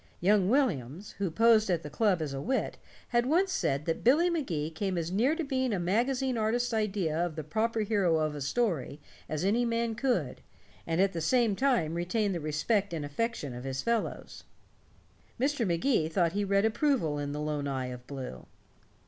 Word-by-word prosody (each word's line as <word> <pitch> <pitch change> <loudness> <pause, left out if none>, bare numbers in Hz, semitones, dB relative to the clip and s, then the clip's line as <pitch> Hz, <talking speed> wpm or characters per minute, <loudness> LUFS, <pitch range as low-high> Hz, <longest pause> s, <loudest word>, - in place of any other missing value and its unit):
Young 195 +1 +3
Williams, 195 - 0
who 195 -2 0
posed 220 +4 +4
at 170 -3 0
the 150 - -6
club 195 -6 +2
as 145 -3 -4
a 135 - -4
wit, 260 - -1 0.3
had 240 0 +2
once 365 +6 +2
said 145 - 0
that 165 - -2
Billy 315 +9 +4
Magee 170 - -2
came 185 +3 -2
as 165 0 -2
near 240 +11 +2
to 330 - -2
being 260 -3 -1
a 200 - 0
magazine 245 +7 0
artist's 240 +2 0
idea 200 -7 0
of 175 -3 -3
the 155 - -4
proper 220 +9 -1
hero 200 -6 +2
of 155 -1 0
a 145 - -6
story 155 - -1 0.3
as 155 +3 -2
any 225 +5 +2
man 230 -1 0
could, 220 - -1 0.5
and 165 +1 0
at 195 0 +3
the 165 - -3
same 230 +3 +2
time 240 - +1
retain 190 +5 0
the 175 - -2
respect 170 +6 0
and 150 -3 -3
affection 150 - -3
of 120 +1 -7
his 135 0 -3
fellows. 230 -1 -2 1.0
Mr. 265 -3 +1
Magee 170 - +1
thought 170 0 +1
he 205 +3 -1
read 200 +1 +2
approval 220 - +1
in 145 0 -3
the 145 - -4
lone 150 -1 -2
eye 130 -2 -2
of 125 0 -9
blue. 130 - -7
195 Hz, 190 wpm, -29 LUFS, 155-235 Hz, 1.0 s, posed